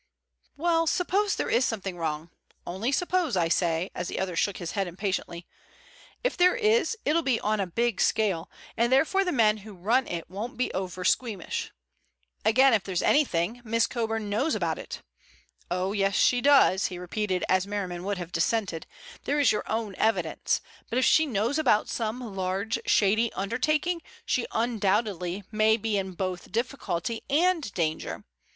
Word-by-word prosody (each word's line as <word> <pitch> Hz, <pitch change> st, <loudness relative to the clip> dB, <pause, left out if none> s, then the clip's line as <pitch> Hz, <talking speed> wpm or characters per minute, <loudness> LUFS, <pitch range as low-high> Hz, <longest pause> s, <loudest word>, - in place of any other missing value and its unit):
"Well, 330 Hz, +1 st, +2 dB
suppose 390 Hz, +5 st, +1 dB
there -, -, -2 dB
is 235 Hz, +3 st, +3 dB
something 200 Hz, -6 st, -2 dB
wrong—only 170 Hz, -, -5 dB
suppose, 345 Hz, -, +1 dB
I 165 Hz, -2 st, +2 dB
say," 170 Hz, +1 st, 0 dB
as 180 Hz, -, -4 dB
the -, -, -4 dB
other 185 Hz, -2 st, -2 dB
shook 200 Hz, +3 st, 0 dB
his 175 Hz, -, -5 dB
head 195 Hz, -3 st, -1 dB
impatiently. 175 Hz, -1 st, -4 dB, 0.8 s
"If -, -, 0 dB
there 360 Hz, +3 st, +4 dB
is, 455 Hz, 0 st, +2 dB
it'll 320 Hz, +3 st, +3 dB
be 260 Hz, -7 st, +1 dB
on 215 Hz, 0 st, 0 dB
a 195 Hz, -, 0 dB
big 235 Hz, +3 st, 0 dB
scale, 195 Hz, -7 st, +1 dB, 0.3 s
and 235 Hz, +2 st, +1 dB
therefore 320 Hz, +9 st, +3 dB
the 360 Hz, -, -1 dB
men 220 Hz, -6 st, +3 dB
who 210 Hz, 0 st, -11 dB
run 225 Hz, +9 st, +1 dB
it 170 Hz, -1 st, -4 dB
won't 215 Hz, +8 st, -6 dB
be 255 Hz, -, -1 dB
over 185 Hz, -1 st, -4 dB
squeamish. 215 Hz, -3 st, -1 dB, 0.7 s
Again, 260 Hz, +4 st, +5 dB
if 215 Hz, -, +2 dB
there's 185 Hz, -2 st, -2 dB
anything, 235 Hz, -, +2 dB
Miss 230 Hz, 0 st, +2 dB
Coburn 225 Hz, -3 st, -2 dB
knows 225 Hz, +10 st, 0 dB
about -, -, -1 dB
it. -, -, -8 dB, 0.7 s
Oh, 185 Hz, +2 st, -1 dB
yes, 195 Hz, -2 st, +1 dB
she 245 Hz, -1 st, +3 dB
does," 275 Hz, -9 st, +5 dB
he 180 Hz, -, -7 dB
repeated 185 Hz, +1 st, -2 dB
as 185 Hz, +1 st, +2 dB
Merriman 185 Hz, -4 st, -4 dB
would 200 Hz, 0 st, -2 dB
have 175 Hz, -1 st, -6 dB
dissented, 180 Hz, -1 st, -1 dB, 0.4 s
"there 290 Hz, +1 st, +1 dB
is 280 Hz, -5 st, +5 dB
your 210 Hz, -, -3 dB
own 220 Hz, -2 st, -2 dB
evidence. 220 Hz, +1 st, 0 dB, 0.3 s
But 240 Hz, -, -1 dB
if 255 Hz, -, +3 dB
she 315 Hz, +4 st, +4 dB
knows 235 Hz, +4 st, 0 dB
about 215 Hz, -9 st, +2 dB
some 225 Hz, -1 st, -3 dB
large, 195 Hz, +4 st, -1 dB
shady 220 Hz, +3 st, +3 dB
undertaking, 305 Hz, -, 0 dB, 0.2 s
she 245 Hz, -, 0 dB
undoubtedly 205 Hz, -5 st, 0 dB
may 215 Hz, 0 st, +3 dB
be 220 Hz, -1 st, -2 dB
in 190 Hz, -1 st, -2 dB
both 185 Hz, 0 st, -4 dB
difficulty 230 Hz, -3 st, -2 dB
and 325 Hz, -, +2 dB
danger. 160 Hz, -2 st, -2 dB
215 Hz, 165 wpm, -27 LUFS, 185-255 Hz, 0.8 s, Again